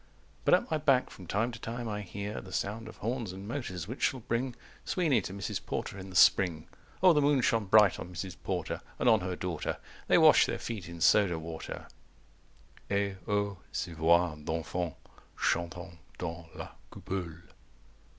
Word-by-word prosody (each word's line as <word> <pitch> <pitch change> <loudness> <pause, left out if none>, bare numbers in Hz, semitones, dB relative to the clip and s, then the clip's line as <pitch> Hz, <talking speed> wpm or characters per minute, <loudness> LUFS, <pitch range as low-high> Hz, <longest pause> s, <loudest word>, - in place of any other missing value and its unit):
But - - +7
at - - -2
my 155 - +1
back 135 -4 +3
from 90 - -11
time 110 +7 0
to 115 - -9
time 120 +2 -5
I 105 -1 -3
hear 100 +2 -5
The 95 - -12
sound 110 +4 -3
of - - -11
horns 115 -3 -2
and 95 +2 -8
motors, 100 - -4
which 125 +5 -7
shall 130 - +1
bring 120 +2 -1 0.3
Sweeney 155 - +2
to 95 - -6
Mrs. 100 -1 -4
Porter - - -4
in 95 0 -8
the 90 - -10
spring. 85 -3 +5 0.4
O 185 -2 +8
the 150 - +3
moon 145 -2 +4
shone 115 -3 +2
bright 105 -1 +6
on 90 - -7
Mrs. 90 +1 -5
Porter - - -2 0.2
And - - 0
on 110 -2 +6
her 90 -1 -3
daughter 90 -3 -2
200 - - -15 0.3
They - - +5
wash - - +7
their - - -2
feet 105 -7 -5
in 85 -1 -9
soda 95 -2 +5
water 80 0 -6 1.0
_Et 100 -1 0
O 100 -2 0
ces 85 -1 -3
voix 85 +1 +4
d'enfants, 80 0 -2 0.4
chantant 85 0 -2 0.2
dans 85 -1 -5
la - - -6 0.2
coupole! 85 -3 -5
100 Hz, 180 wpm, -31 LUFS, 85-115 Hz, 1.0 s, O